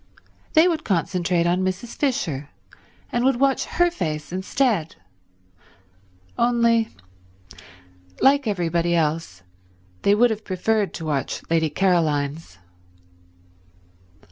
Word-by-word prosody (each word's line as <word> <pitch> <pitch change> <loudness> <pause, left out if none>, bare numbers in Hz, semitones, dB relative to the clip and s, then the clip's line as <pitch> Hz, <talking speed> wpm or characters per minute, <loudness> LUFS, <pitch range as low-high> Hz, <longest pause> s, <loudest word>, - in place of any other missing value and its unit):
They 320 +2 +6
would 325 -3 -1
concentrate 175 -2 0
on 175 +2 +1
Mrs. 185 +5 -3
Fisher, 165 - -2 0.6
and 240 - 0
would 265 0 +3
watch 275 -1 +2
her 350 0 +1
face 155 - -4
instead; 190 - 0 1.4
only, 235 -2 +3 1.3
like 280 -1 +4
everybody 170 -3 0
else, 155 - -1 0.6
they 200 - +4
would 240 +2 +4
have 220 0 -4
preferred 205 +2 -1
to 165 - -6
watch 145 -3 -2
Lady 160 -1 +2
Caroline's. 155 - 0
185 Hz, 100 wpm, -23 LUFS, 165-240 Hz, 1.4 s, They